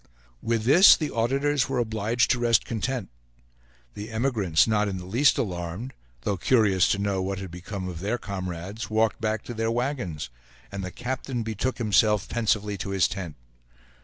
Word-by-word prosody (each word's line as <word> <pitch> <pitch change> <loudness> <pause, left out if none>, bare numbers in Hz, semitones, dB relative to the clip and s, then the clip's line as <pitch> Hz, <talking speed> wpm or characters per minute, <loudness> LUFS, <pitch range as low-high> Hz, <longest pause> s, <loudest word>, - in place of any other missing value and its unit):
With 115 -1 0
this 170 - +8
the 155 -3 -3
auditors 135 +4 +1
were 135 - -1
obliged 115 0 +1
to 125 - +1
rest 115 -2 +3
content; 115 - -3 0.8
the 105 +2 -7
emigrants, 110 -8 +2
not 105 -1 +1
in 95 -2 -3
the 90 - -8
least 120 +10 +3
alarmed, 90 +5 -4 0.3
though 100 +8 -1
curious 100 -3 +3
to - - +1
know 100 -1 -1
what 95 +1 -2
had 95 -2 -7
become 90 +2 -6
of 85 -3 -6
their 105 +6 -1
comrades, 95 +1 -6
walked 110 0 +1
back 110 -1 -1
to 120 - -7
their 115 0 -1
wagons 115 - -3 0.4
and 100 -1 -5
the 90 - -4
captain 125 +2 -4
betook 110 +3 -2
himself 105 -2 +2
pensively 105 -3 -1
to 95 - -4
his 95 -3 +2
tent. 90 -6 -6
110 Hz, 170 wpm, -26 LUFS, 95-120 Hz, 0.8 s, this